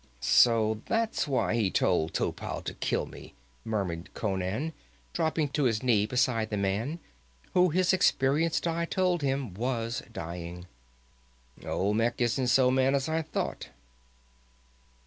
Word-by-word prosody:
"So 110 - +4
that's 225 -5 0
why 130 -5 +1
he 110 -4 +2
told 85 -3 +1
Topal - - -2
to - - -4
kill - - -1
me!" - - -12 0.3
murmured 95 -7 -3
Conan, 100 - -2 0.4
dropping 160 -3 0
to 145 0 0
his 115 -2 +1
knee 110 -5 +3
beside 125 -3 +1
the 105 - -2
man, 100 - -1 0.6
who 180 0 +5
his 180 +3 +2
experienced 160 -3 +2
eye 170 0 0
told 180 -1 0
him 135 -6 -1
was 120 +4 -2
dying. 85 -2 -7 1.0
"Olmec 105 +5 0
isn't 125 +2 +1
so 125 0 +4
mad 130 +1 +3
as 135 +1 0
I 160 +1 0
thought." 160 - -4
125 Hz, 130 wpm, -29 LUFS, 105-150 Hz, 1.0 s, who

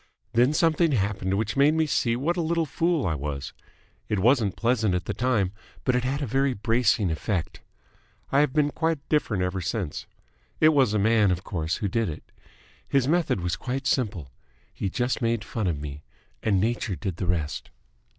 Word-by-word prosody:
Then 120 +4 +4
something 165 0 +2
happened 95 -3 0
which 110 0 -1
made 145 +3 +4
me 160 0 +2
see 120 -5 +1
what 150 +8 0
a 175 - 0
little 165 0 0
fool 165 0 0
I 85 - +1
was. 70 -1 -4 0.6
It 105 - +1
wasn't 110 0 +3
pleasant 115 -5 +1
at 90 0 -2
the - - -2
time, 110 -6 +1 0.3
but 125 - +2
it 125 - +1
had 140 +3 -1
a - - 0
very 135 +2 +1
bracing 110 -3 +2
effect. 85 +2 -3 0.7
I 140 - +4
have 150 -2 +3
been 150 0 +2
quite 160 -2 -1
different 110 -11 +1
ever 90 +1 -2
since. 90 -2 -3 0.5
It 155 - +6
was 135 -8 +3
a - - +4
man, 105 0 +4
of 90 0 -1
course, 85 -3 -2
who 105 - -2
did 115 +2 0
it. 80 0 -7 0.6
His 135 -2 +2
method 165 - +1
was 90 -1 -1
quite 130 +6 -4
simple. 95 - -1 0.4
He 100 - -3
just 125 +5 -1
made 115 -2 0
fun 105 +1 -3
of 80 -5 -1
me, 75 0 -7 0.4
and 100 -3 +2
Nature 110 -1 -1
did 90 -1 -4
the 90 - -3
rest." 80 -4 -2
115 Hz, 190 wpm, -26 LUFS, 95-135 Hz, 0.7 s, It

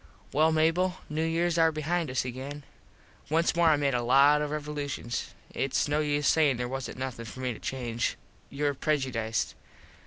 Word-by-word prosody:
Well, 155 +3 +4
Mable, 165 +4 +2 0.2
New 155 +1 0
Years 165 +1 +1
are 165 0 +5
behind 160 +1 -1
us 125 0 -1
again. 135 +4 -6 0.7
Once 165 +3 +2
more 170 -1 +4
I 155 - +5
made 140 -1 +1
a 120 - +1
lot 140 +5 +5
of 150 - -1
revolushuns. 145 -5 -4 0.2
Its 135 - 0
no 145 +1 +1
use 145 -1 +1
sayin 150 -5 +4
there 125 0 -2
wasnt 135 0 -5
nothin 130 -3 -5
for 110 +4 -9
me 125 -1 -1
to - - -11
change. 120 -3 -2 0.3
Youre 145 +1 -1
prejudiced. 130 -7 -1
145 Hz, 175 wpm, -28 LUFS, 130-155 Hz, 0.7 s, are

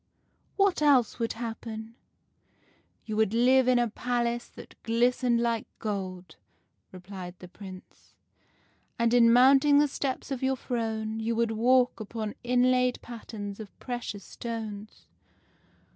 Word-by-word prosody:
* - - -44 0.2
What 395 -5 +2
else 270 -6 +3
would 230 -1 -1
happen? 225 -1 -6 0.5
' - - -38
"'You 215 - -4
would 220 0 +2
live 255 +2 +4
in 255 -1 +4
a 240 0 +2
palace 240 +1 -2
that - - -14
glistened 240 +1 +2
like 235 -1 -1
gold,' 185 -5 -5 0.5
replied 185 -1 -9
the 180 - -11
Prince, 185 0 -13 0.4
' - - -39
and 235 -1 +2
in 235 -1 +6
mounting 270 +4 +6
the 295 +1 +5
steps 275 0 -4
of 265 - -3
your 265 0 +1
throne 220 -3 -3
you 225 +1 -1
would 230 0 +1
walk 250 +3 +3
upon 215 0 -5
inlaid 250 0 +2
patterns 215 -3 -7
of 215 -2 -10
precious 240 -5 -5
stones. 220 -3 -7
235 Hz, 140 wpm, -28 LUFS, 215-250 Hz, 0.5 s, in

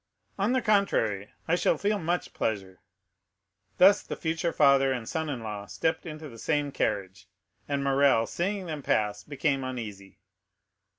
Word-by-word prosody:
"On 205 +6 +2
the 260 - +1
contrary, 115 - +1 0.2
I 165 - +1
shall - - +2
feel 205 0 0
much 175 +1 -2
pleasure." 95 -4 -3 1.0
Thus, 195 +2 +7
the - - -6
future 165 +1 -1
father 140 -3 +4
and 120 -4 -3
son 160 -1 -2
in 130 -5 -4
law 105 -2 -5
stepped 160 - -1
into 155 0 -7
the 115 -4 -12
same 145 +2 0
carriage, 95 -6 -2 0.4
and 140 -1 -1
Morrel, 135 -4 +4
seeing 190 - -2
them 155 -4 -5
pass, 105 -5 0
became 140 0 -1
uneasy. 105 -7 -6
140 Hz, 155 wpm, -28 LUFS, 110-165 Hz, 1.0 s, Thus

